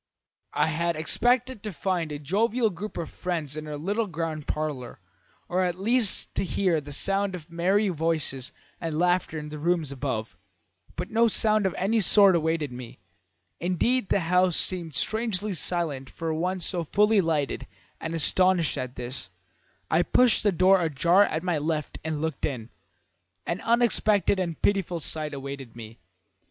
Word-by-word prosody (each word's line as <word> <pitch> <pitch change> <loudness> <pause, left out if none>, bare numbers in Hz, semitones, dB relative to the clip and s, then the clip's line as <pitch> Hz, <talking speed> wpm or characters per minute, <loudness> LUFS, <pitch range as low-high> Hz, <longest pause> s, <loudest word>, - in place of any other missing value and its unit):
"I - - +3
had 170 +2 -1
expected 245 +9 +1
to 215 - -5
find 170 -1 -2
a 145 - -4
jovial 215 - +1
group 200 +4 -7
of 170 - -3
friends 165 -6 -4
in 155 0 -6
her 150 -1 -5
little 205 +8 -1
ground 160 -3 -4
parlour, 145 -8 -4 0.5
or 185 +1 0
at 180 0 -2
least 225 +1 +2
to - - -1
hear 180 -4 0
the 145 0 -10
sound 195 +5 0
of 165 -2 -11
merry 190 +5 +2
voices 155 -6 -1 0.3
and 165 -3 -3
laughter 175 -1 +1
in 150 0 -6
the 150 0 -7
rooms 165 -2 0
above; 120 -7 -4 0.6
but - - -5
no 230 +1 +4
sounds 215 -2 +3
of 185 - -4
any 220 +5 +1
sort 200 -1 +6
awaited 160 -3 0
me; 125 -1 -9 0.6
indeed 190 +7 0
the 200 - +2
house 180 +1 +2
seemed 170 -5 -1
strangely 215 -2 -1
silent 160 -7 -1
for 165 -1 -4
one 180 +4 -1
so 175 0 0
fully 210 +5 +3
lighted, 155 -5 -1 0.3
and, 165 +1 -4
astonished 175 -1 +3
at 130 -1 -5
this, 125 +2 -6 0.6
I - - +4
pushed 250 -3 +3
the 205 - +3
door 185 +1 +4
ajar 170 +5 +3
at 160 -2 -3
my 175 -4 0
left 150 0 -3
and 155 -1 -3
looked 160 -4 -3
in. 120 -6 -5 0.7
An 170 - -3
unexpected 215 -4 +2
and 170 -3 -3
pitiful 190 -4 0
sight 155 -1 -3
awaited 135 -3 -7
me. 115 -2 -10
170 Hz, 165 wpm, -26 LUFS, 150-195 Hz, 0.7 s, sort